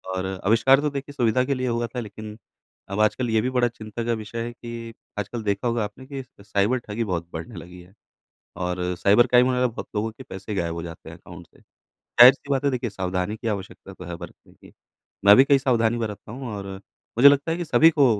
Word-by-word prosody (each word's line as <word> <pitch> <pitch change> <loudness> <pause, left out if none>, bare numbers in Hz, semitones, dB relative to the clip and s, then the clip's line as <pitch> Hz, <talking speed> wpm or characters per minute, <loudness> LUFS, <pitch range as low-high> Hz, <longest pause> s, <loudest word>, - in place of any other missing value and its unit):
और 95 0 -2 0.2
आविष्कार 115 +6 +5
तो 150 - 0
देखिए 140 0 -6
सुविधा 125 -2 +2
के 140 - 0
लिए 130 -1 -2
हुआ 120 0 -1
था - - -1
लेकिन 105 -1 -8 0.5
अब 100 +2 -3
आजकल 115 +3 +1
ये 110 -1 +2
भी 125 - -1
बड़ा 125 -1 +2
चिंता 115 0 -7
का 120 - +1
विषय 115 +2 -5
है 120 - -5
कि 115 -1 -8 0.3
आजकल 110 +3 -4
देखा 100 +3 -1
होगा 115 -1 0
आपने 105 +6 -8
कि 135 -1 -6 0.2
साइबर 105 +4 +1
ठगी 110 +2 -2
बहुत 85 -5 -3
बढ़ने 85 +7 -7
लगी 90 +1 -10
है। 90 +2 -18 0.6
और 90 0 -2 0.2
साइबर 105 +5 +5
क्राइम 125 +1 +4
में 125 0 +2
बहुत 115 - -8
लोगों 110 +2 -1
के 110 - -12
पैसे 100 +2 -7
गायब 85 -3 -1
हो 85 - -5
जाते 85 -1 -9
हैं - - -11
अकाउंट - - -13
से। - - -25 0.4
ज़ाहिर-सी 130 +3 +6
बात 135 0 +1
है 140 - +3
देखिए, 125 -2 -2
सावधानी 95 +1 -3
की 115 - -5
आवश्यकता 100 -2 -5
तो 90 - -11
है 85 0 -6
बरतने - - -13
की, - - -19 0.5
मैं 100 +1 +9
भी 130 - +8
कई 140 - +5
सावधानी 120 -4 +1
बरतता 110 -2 -5
हूँ 130 +1 -7
और 100 -1 -6 0.5
मुझे 135 +4 +9
लगता 145 +3 +1
है 165 - -1
कि 175 - -3
सभी 160 +1 +6
को 145 -3 +4
115 Hz, 230 wpm, -24 LUFS, 100-125 Hz, 0.6 s, मैं